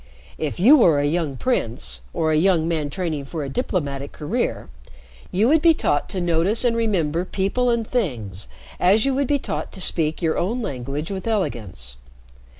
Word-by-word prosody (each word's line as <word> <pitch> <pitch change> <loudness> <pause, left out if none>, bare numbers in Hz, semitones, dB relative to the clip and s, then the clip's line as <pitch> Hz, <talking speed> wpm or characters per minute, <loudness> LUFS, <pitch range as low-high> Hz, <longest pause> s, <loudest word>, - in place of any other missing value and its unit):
"If 155 +2 -3
you 260 +12 +7
were 165 - +5
a 145 - +1
young 150 -3 -1
prince 115 - -1
or 160 -1 0
a - - +2
young 165 0 +3
man 155 -3 -1
training 155 -4 -3
for 155 +2 -5
a 140 - -5
diplomatic 140 - -3
career, 150 - -3 0.6
you 205 +5 +2
would 310 +3 +4
be 330 -1 +5
taught 145 - 0
to 190 - -2
notice 175 +7 +2
and 235 -1 +2
remember 180 -8 0
people 200 +7 0
and 235 -1 +1
things 115 - -3 0.3
as 200 +6 +4
you 275 - +1
would 275 0 0
be 290 - +2
taught - - -5
to - - -7
speak 160 -4 +2
your 160 -3 0
own 225 +8 -1
language 140 - -4
with 195 +2 -5
elegance. 105 - -3
170 Hz, 180 wpm, -22 LUFS, 145-220 Hz, 0.6 s, you